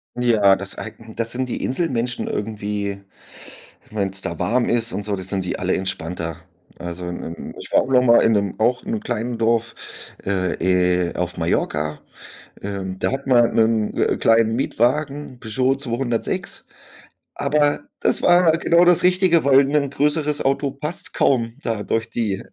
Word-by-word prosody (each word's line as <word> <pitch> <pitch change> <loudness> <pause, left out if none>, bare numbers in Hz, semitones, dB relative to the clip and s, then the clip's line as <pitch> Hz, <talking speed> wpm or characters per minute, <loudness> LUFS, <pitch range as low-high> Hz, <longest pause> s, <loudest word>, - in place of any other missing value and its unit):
Ja, 110 -5 +4
das 100 0 -4
äh, - - -6 0.2
das 115 0 -1
sind 130 +1 -2
die - - -4
Inselmenschen 125 -5 -1
irgendwie. 105 -2 -3 0.9
Wenn's 100 -2 -2
da 85 - -4
warm 120 +8 +1
ist 115 -1 0
und 100 - -4
so, 105 -1 -2
dann 95 - -6
sind 95 0 -2
die 90 - -3
alle 90 0 0
entspannter. 85 -3 -4 0.4
Also, 85 0 -6
ähm, 85 -1 -6
ich - - -9
war - - +5
auch - - -7
noch 125 -1 +5
mal 120 -2 +6
in 115 - +3
'nem 100 -1 -1
auch 125 +3 +2
in 220 - -4
'nem 220 - -1
kleinen 120 - -3
Dorf, 115 0 +1 0.5
äh, 95 -2 0 0.6
äh, - - -11
auf 90 0 -3
Mallorca, 75 -2 -1 0.6
ähm, 95 -2 -5
da - - -1
hatten 135 0 -3
wir, 120 -2 +6
'nen, 110 -2 +1
äh, - - +1
kleinen 115 0 +3
Mietwagen, 140 +3 -1
'n 125 - -21
Peugeot 130 +4 0
206, 120 -3 -3 0.7
aber 145 - +1 0.2
das - - +2
war 175 -1 +5
genau 170 +1 +4
das 175 -1 +4
Richtige, 180 -2 +4
weil 135 -1 +6
'n 140 0 +1
größeres 150 +1 0
Auto 140 +1 0
passt 150 +5 -5
kaum 115 -4 +1
da 115 -3 -2
durch 115 +1 -1
die 110 -5 -2
115 Hz, 170 wpm, -21 LUFS, 100-135 Hz, 0.9 s, mal